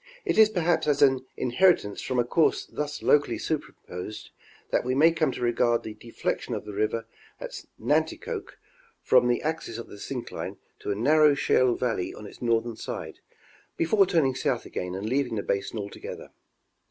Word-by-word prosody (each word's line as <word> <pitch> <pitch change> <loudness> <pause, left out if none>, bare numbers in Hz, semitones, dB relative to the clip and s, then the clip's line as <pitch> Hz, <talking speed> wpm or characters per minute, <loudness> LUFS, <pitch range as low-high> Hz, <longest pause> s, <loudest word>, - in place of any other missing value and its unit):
It - - +1
is 215 -1 +8
perhaps 175 -5 +1
as 145 -1 +3
an 130 -1 +3
inheritance 125 - +2
from 130 - -2
a 120 - +4
course 155 +6 +2
thus 150 0 -5
locally 145 0 +3
superimposed 105 - -5 0.4
that - - +2
we 130 +1 -1
may 160 +4 +6
come 160 -4 +1
to - - -7
regard 120 0 +2
the 110 - -6
deflection 115 +2 -3
of - - -6
the 105 - -7
river 110 +2 -1 0.3
at - - -7 0.2
Nanticoke 450 -5 -1 0.5
from 125 -1 +5
the 120 -1 +1
axis 155 -7 -3
of 120 - -8
the 100 - -11
syncline 125 +1 -5 0.2
to - - -6
a 100 - +1
narrow 150 +6 +5
shale 130 -3 +3
valley 115 -8 -2
on 105 - -10
its - - -12
northern 115 -1 0
side, - - -6 0.6
before 195 +4 +4
turning 160 -8 +2
south - - -1
again 90 0 -4
and 100 +3 -4
leaving 130 -1 0
the 100 - -2
basin 100 +3 -2
altogether. 100 -1 -7
125 Hz, 175 wpm, -27 LUFS, 115-155 Hz, 0.6 s, is